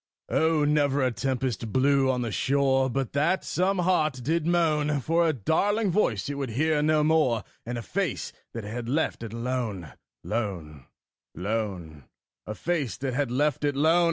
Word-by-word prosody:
Oh! 160 -1 +2
never 145 -2 +2
a 130 - +2
tempest 125 -3 -2
blew 135 +1 +3
on 125 -1 0
the 115 - -3
shore 135 +4 +2
But 135 0 -2
that 155 +7 +1
some 190 +2 0
heart 155 -7 +1
did 160 +4 0
moan 155 -4 +2
For 165 +5 +2
a - - +3
darling 195 - +1
voice 130 - +1
it 145 - -2
would 135 -3 -2
hear 150 +6 +1
no 155 0 +3
more 150 -9 +2 0.2
And 120 0 -3
a 115 - -5
face - - -2 0.2
that 115 - -5
had 115 +3 -5
left 150 -1 0
it 115 -3 -6
lone, 115 - -3 0.3
lone, 85 - -4 0.5
lone 90 - -4 0.4
A 105 - -4
face 145 - -2
that 130 0 -3
had 140 0 0
left 145 +3 0
it 145 -1 +1
lone! 160 +5 +4
135 Hz, 170 wpm, -26 LUFS, 115-155 Hz, 0.5 s, lone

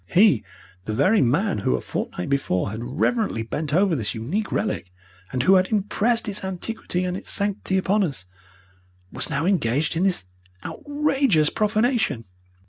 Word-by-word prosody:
He, 180 - +4 0.4
the 110 - -2
very 185 - +4
man 150 - +1
who 65 - +1
a - - -1
fortnight 90 - -4
before 120 -9 0
had 110 +2 -5 0.2
reverently 215 - +1
bent 150 +6 -3
over 185 +2 +3
this 105 -6 -2
unique 170 - -2
relic, 90 - -2 0.4
and 125 -1 0
who 190 - +5
had 185 0 +5
impressed 220 +3 0
its 205 -1 -3
antiquity 190 0 -2
and 180 0 -2
its - - -7
sanctity 200 -2 0
upon 200 +2 +2
us, 140 - -3 0.9
was - - -5
now 150 +2 -1
engaged 150 - +1
in 165 - 0
this 185 - +1 0.4
outrageous 280 - +1
profanation. 215 - +1
185 Hz, 155 wpm, -23 LUFS, 135-210 Hz, 0.9 s, who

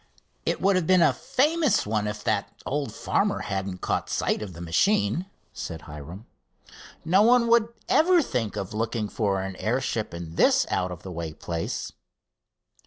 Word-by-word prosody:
"It - - +1
would 195 +1 +4
have 170 -3 -1
been 185 -2 +5
a - - +4
famous 300 +1 +1
one 105 0 0
if 105 0 -5
that 105 -2 0
old 140 -4 -2
farmer - - 0
hadn't 95 -1 -4
caught - - -1
sight - - 0
of 100 -4 -6
the 85 - -11
machine," 105 - +1 0.3
said 80 -2 -6
Hiram. 80 +7 -9 0.8
"No 185 +5 +4
one 240 +2 +5
would 230 -1 +5 0.2
ever 345 +1 +4
think 115 - -2
of 95 - -4
looking 110 0 -1
for 100 -2 -1
an 95 -1 -5
airship 115 -1 -1
in 85 -1 -8
this - - +4
out 90 0 0
of 90 -1 -8
the 95 - -7
way 85 -2 -5
place." 85 +1 -4
105 Hz, 170 wpm, -26 LUFS, -, 0.8 s, been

